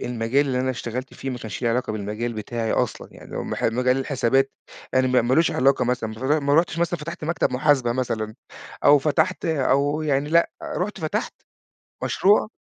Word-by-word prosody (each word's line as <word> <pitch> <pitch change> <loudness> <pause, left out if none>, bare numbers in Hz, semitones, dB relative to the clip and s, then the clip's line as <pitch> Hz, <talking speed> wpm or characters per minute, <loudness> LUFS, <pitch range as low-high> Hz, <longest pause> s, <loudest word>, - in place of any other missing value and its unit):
المجال 125 +4 0
اللي 125 -1 0
أنا 130 0 0
اشتغَلت 125 +1 -5
فيه 135 - -5
ما 125 - -5
كانش 110 +2 -7
ليه 120 - +2
علاقة 125 -1 -1
بالمجال 110 +3 -3
بتاعي 110 +1 -3
أصلًا، - - -1
يعني - - -14
اللي - - -8
هو - - -2
م - - -6 0.3
مجال 125 0 +2
الحسابات 135 0 +1 0.4
يعني، 130 0 +3
ما 125 -2 +3
ما 125 +2 +2
لوش 165 +3 +4
علاقة 135 +2 +2
مثلًا، 120 -2 -1
ما 140 +5 +1
ما 140 0 +1
رُحتش 165 0 +2
مثلًا 170 0 0
فتَحت 165 +2 -6
مكتب 165 -4 0
محاسبة 130 -2 +2
مثلًا، 115 -4 -2 0.5
أو 145 - +7
فتَحت 155 +5 0
أو 145 -1 +1
يعني 145 -1 0
لأ، 170 +1 +4 0.3
رُحت 200 +4 -3
فتَحت 155 -1 -2 0.7
مشروع 205 +2 +3
130 Hz, 190 wpm, -23 LUFS, 120-150 Hz, 0.7 s, أو